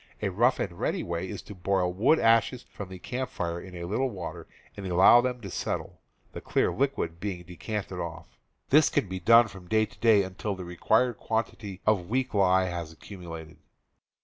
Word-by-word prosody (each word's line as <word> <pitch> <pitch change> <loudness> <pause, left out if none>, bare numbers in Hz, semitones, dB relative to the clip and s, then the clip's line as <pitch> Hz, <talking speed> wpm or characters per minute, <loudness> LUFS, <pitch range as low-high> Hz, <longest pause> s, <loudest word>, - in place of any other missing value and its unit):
A 100 - +1
rough 120 +7 +2
and 85 -3 -4
ready - - -1
way 85 +2 -3
is - - -6
to 105 - -10
boil 90 -1 0
wood 115 - +4
ashes 115 +1 +3
from 100 -2 -8
the,;, 95 - -8
Tjr - - -22
]r' - - -10
camp 130 - -2
fire 85 0 -3
in 95 -1 -11
a 85 - -6
little 110 +9 0
water 85 -5 -7 0.3
and 100 -1 -6
allow 95 +7 +7
them 125 0 -1
^ - - -17
^* - - -20
to 100 - -6
settle, - - -4 0.3
the - - -7
clear - - +1
liquid 125 -12 -1
being 90 -3 -4
decanted 95 +2 -5
off; 85 -2 -7 0.4
this 150 +2 +6
can - - 0
be 95 0 -5
done 115 +6 +6
from 95 -4 -12
day 110 +3 +3
to - - -19
day 110 -3 +5
until 95 +2 -4
the 95 -1 -7
required 110 +7 +1
quantity 110 -3 -3
of 100 -5 +2
weak 130 +2 -1
lye 95 -2 +4
has 85 -3 -4
accumulated. 80 -2 -10
95 Hz, 210 wpm, -28 LUFS, 90-110 Hz, 0.4 s, allow